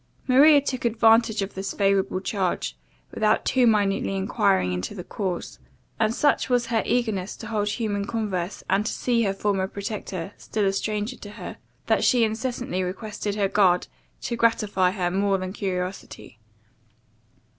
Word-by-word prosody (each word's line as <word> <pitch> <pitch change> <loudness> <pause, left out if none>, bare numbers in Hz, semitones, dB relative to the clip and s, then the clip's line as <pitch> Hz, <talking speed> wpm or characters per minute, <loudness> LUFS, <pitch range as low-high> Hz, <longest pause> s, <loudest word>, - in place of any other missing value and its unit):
Maria 285 +3 +7
took 270 -2 -4
advantage 225 -2 +3
of 195 - -6
this 190 +1 -4
favourable 195 -2 +1
charge, 185 - -2 0.4
without 215 0 +1
too 255 -2 +3
minutely 200 -3 +1
enquiring 195 - +1
into 90 - -4
the 180 - -6
cause; 185 -3 -4 0.4
and 220 +1 +1
such 290 -2 +2
was 245 -1 +2
her 230 -2 0
eagerness 215 -6 -1
to - - -9
hold 210 -1 -1
human 205 -2 -2
converse, 200 -5 -3
and 205 - +2
to - - -1
see 240 -2 0
her 200 -4 +1
former 195 -2 0
protector, 200 -2 -5
still 215 -2 -2
a 195 - +2
stranger 210 +4 -2
to 205 - -10
her, - - -8 0.3
that - - +2
she 245 -3 +4
incessantly 225 -3 -2
requested 205 +2 -4
her 205 -2 +1
guard 185 -3 +3 0.3
to 235 - -3
gratify 210 -5 +2
her 180 -2 -1
more 195 +1 +1
than 185 0 -5
curiosity. 185 - -5
205 Hz, 155 wpm, -25 LUFS, 190-225 Hz, 0.4 s, Maria